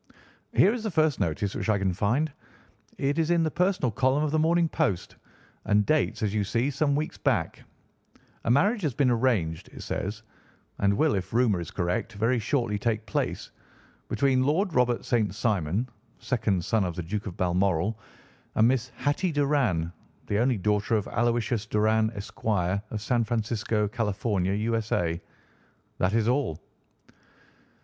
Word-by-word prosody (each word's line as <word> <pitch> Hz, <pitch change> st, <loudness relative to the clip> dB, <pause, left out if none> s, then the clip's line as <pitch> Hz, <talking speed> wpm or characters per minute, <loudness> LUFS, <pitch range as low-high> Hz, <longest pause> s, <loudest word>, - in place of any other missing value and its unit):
"Here 205 Hz, -, +5 dB
is 245 Hz, -, -3 dB
the 220 Hz, -, -2 dB
first 155 Hz, -5 st, +2 dB
notice 95 Hz, +5 st, -1 dB
which -, -, -3 dB
I 105 Hz, -, +3 dB
can 95 Hz, -2 st, 0 dB
find. 125 Hz, -, 0 dB, 0.6 s
It 140 Hz, +3 st, 0 dB
is 160 Hz, 0 st, +1 dB
in 170 Hz, -1 st, +3 dB
the 160 Hz, -, 0 dB
personal 180 Hz, -, +1 dB
column 130 Hz, +5 st, +2 dB
of 150 Hz, -, 0 dB
the 155 Hz, -, +2 dB
Morning 165 Hz, +2 st, +3 dB
Post, 145 Hz, -, -1 dB, 0.5 s
and 105 Hz, 0 st, +3 dB
dates, 140 Hz, -5 st, +1 dB
as 105 Hz, -1 st, 0 dB
you 105 Hz, -1 st, +1 dB
see, 115 Hz, +7 st, 0 dB
some 140 Hz, +1 st, +1 dB
weeks 155 Hz, +2 st, -3 dB
back: -, -, 0 dB, 0.8 s
'A -, -, -2 dB
marriage 200 Hz, -, +3 dB
has 150 Hz, -9 st, -1 dB
been 130 Hz, -2 st, +3 dB
arranged,' 110 Hz, -10 st, 0 dB
it -, -, -9 dB
says, 105 Hz, +3 st, -4 dB, 0.6 s
'and 100 Hz, 0 st, +3 dB
will, 155 Hz, +2 st, +3 dB
if 95 Hz, 0 st, -3 dB
rumour 115 Hz, -6 st, +3 dB
is 85 Hz, -, -6 dB
correct, 100 Hz, +5 st, -2 dB
very 115 Hz, +4 st, +1 dB
shortly 110 Hz, -2 st, 0 dB
take 110 Hz, 0 st, -1 dB
place, -, -, -2 dB, 0.6 s
between 135 Hz, -2 st, +2 dB
Lord 165 Hz, +7 st, +1 dB
Robert 125 Hz, -3 st, +2 dB
St. 110 Hz, -5 st, +1 dB
Simon, 100 Hz, 0 st, 0 dB, 0.3 s
second 105 Hz, -8 st, -1 dB
son 110 Hz, -3 st, +2 dB
of 90 Hz, -3 st, -3 dB
the 90 Hz, -, -4 dB
Duke 105 Hz, +5 st, -4 dB
of 90 Hz, -, -7 dB
Balmoral, 95 Hz, +3 st, +1 dB, 0.6 s
and 110 Hz, -, +5 dB
Miss 125 Hz, -1 st, +1 dB
Hatty 150 Hz, +5 st, 0 dB
Doran, 135 Hz, -, +1 dB, 0.3 s
the 100 Hz, -, 0 dB
only 125 Hz, 0 st, +2 dB
daughter 105 Hz, +3 st, +1 dB
of 105 Hz, -3 st, -1 dB
Aloysius 120 Hz, -2 st, 0 dB
Doran. 110 Hz, +1 st, +2 dB
Esq., 100 Hz, 0 st, -9 dB
of 100 Hz, +1 st, 0 dB
San 120 Hz, +2 st, +1 dB
Francisco, 110 Hz, -1 st, -1 dB
Cal., 105 Hz, +1 st, -1 dB
U.S.A.' 100 Hz, -3 st, 0 dB, 0.8 s
That 95 Hz, +2 st, +1 dB
is 115 Hz, -1 st, +2 dB
all." 125 Hz, -, 0 dB
115 Hz, 160 wpm, -27 LUFS, 100-135 Hz, 0.8 s, Here